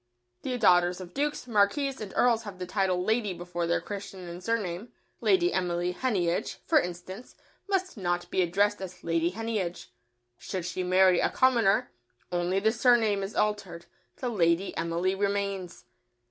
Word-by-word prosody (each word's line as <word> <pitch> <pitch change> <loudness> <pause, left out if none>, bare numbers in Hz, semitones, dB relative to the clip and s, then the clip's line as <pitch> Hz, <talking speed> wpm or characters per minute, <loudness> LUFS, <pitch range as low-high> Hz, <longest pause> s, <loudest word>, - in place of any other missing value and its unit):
The 255 -1 -2
daughters 180 -4 +4
of 180 -1 -9
dukes, 295 0 -2
marquises 250 +5 +1
and 205 -3 -6
earls 235 -2 +3
have 205 -4 -9
the 180 - -5
title 185 -1 0
"Lady" 215 -2 0
before 175 0 -4
their 170 - +2
Christian 195 -3 -7
and 175 +1 -8
surname; 215 -2 -2 0.3
"Lady 365 -3 +3
Emily 175 -1 0
Heneage," 180 -7 -1
for - - +5
instance, 180 +6 -7 0.3
must 375 - -1
not 175 -2 -1
be 185 - +2
addressed 200 +4 +1
as 185 -1 -8
"Lady 165 0 +1
Heneage." 210 -3 -4 0.5
Should 185 -3 -4
she 180 +1 -3
marry 185 0 +4
a - - +2
commoner 235 -6 +3 0.4
only 175 +2 +1
the 220 +2 +3
surname 225 -3 +3
is 195 +2 -5
altered, 200 -5 -1 0.3
the 250 - -3
"Lady 175 -3 +1
Emily" 170 +3 0
remains. 200 -2 -2
190 Hz, 155 wpm, -28 LUFS, 175-220 Hz, 0.5 s, for